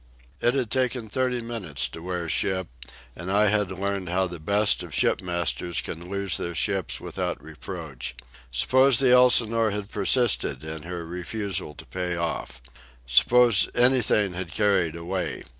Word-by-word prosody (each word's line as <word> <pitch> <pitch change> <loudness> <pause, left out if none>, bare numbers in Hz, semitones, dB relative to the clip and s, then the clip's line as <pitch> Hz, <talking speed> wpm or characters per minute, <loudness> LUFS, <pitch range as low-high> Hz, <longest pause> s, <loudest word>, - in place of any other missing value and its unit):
It 120 +2 +2
had 125 -5 -1
taken 125 -3 -1
thirty 125 +1 0
minutes 110 - -4
to 80 - -10
wear 90 -1 -4
ship, 95 +3 0 0.5
and 90 +3 -5
I 105 +1 +4
had 105 -2 +1
learned 95 -1 -3
how 95 +2 +1
the 85 -2 -7
best 100 +6 +2
of - - -7
shipmasters 85 -3 0
can 85 +2 -7
lose 100 -2 -1
their 85 0 -4
ships 95 -2 -1
without - - -4
reproach. 75 -5 -7 0.4
Suppose 130 - +4
the 130 -2 +4
Elsinore 115 -3 +5
had 105 0 -5
persisted 110 -2 +1
in 80 0 -6
her 85 +1 -6
refusal 90 -1 -4
to - - -12
payoff? 85 -7 -4 0.4
Suppose 115 - +4
anything 120 -6 +3
had 90 -1 -5
carried 100 -6 +1
away? 85 -2 -4
95 Hz, 145 wpm, -25 LUFS, 85-110 Hz, 0.5 s, Elsinore